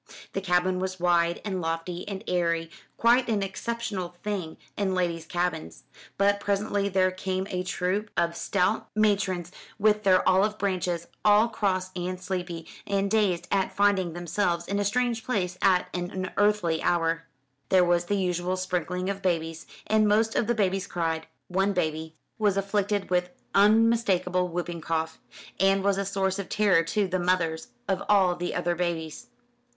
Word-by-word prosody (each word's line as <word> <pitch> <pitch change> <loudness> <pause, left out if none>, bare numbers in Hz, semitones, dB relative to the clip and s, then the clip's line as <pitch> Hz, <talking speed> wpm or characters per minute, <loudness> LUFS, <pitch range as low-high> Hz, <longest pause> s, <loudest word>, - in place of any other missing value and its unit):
The 195 - -2
cabin 180 0 +1
was 185 0 -3
wide 170 -1 +2
and 190 -3 -2
lofty 165 +2 -3
and 200 0 -5
airy, 170 -2 0 0.3
quite 240 +1 +4
an 210 -3 +1
exceptional 195 -2 -4
thing 190 -6 -3 0.2
in 195 -2 0
ladies' 170 -3 -1
cabins; 175 - -3 0.3
but 200 +1 +3
presently 200 0 0
there 185 -1 +2
came 185 0 -3
a 180 - -1
troop 185 +3 -2
of 170 0 +1
stout 190 +4 0
matrons 195 -5 +1 0.3
with 210 0 +3
their 190 -3 +4
olive 200 +3 +3
branches, 180 -4 -1 0.2
all 210 +2 +5
cross 185 -4 -1
and 180 0 -3
sleepy, 180 -3 -4 0.2
and 200 0 0
dazed 200 -6 +1
at 195 -1 0
finding 200 -4 +2
themselves 175 0 -1
in 200 +1 -1
a - - +1
strange 235 +2 0
place 185 -7 -1
at 185 -2 +3
an 180 0 -3
unearthly 190 -3 0
hour. 165 -1 0 0.4
There 185 -2 +5
was 175 0 +2
the 205 +3 0
usual 180 -1 -1
sprinkling 180 0 -2
of 200 0 -3
babies, 165 -3 -2 0.2
and 215 0 +3
most 220 +2 +3
of - - +1
the 240 - +1
babies 195 -3 0
cried. 165 -2 -2 0.2
One 195 +2 +1
baby 160 -2 -2 0.2
was 205 -3 +2
afflicted 200 0 -1
with 180 0 +1 0.2
unmistakable 205 -4 +3
whooping 175 -1 -4
cough, 160 0 -2 0.4
and 195 0 +3
was 200 0 +2
a 200 - -1
source 190 0 -1
of 195 - -5
terror 205 -5 +4
to 200 +4 0
the 185 0 -1
mothers 175 -3 0 0.2
of 190 -1 0
all 190 -4 +4
the 175 0 -3
other 175 0 0
babies. 170 -3 -3
185 Hz, 160 wpm, -27 LUFS, 175-200 Hz, 0.4 s, all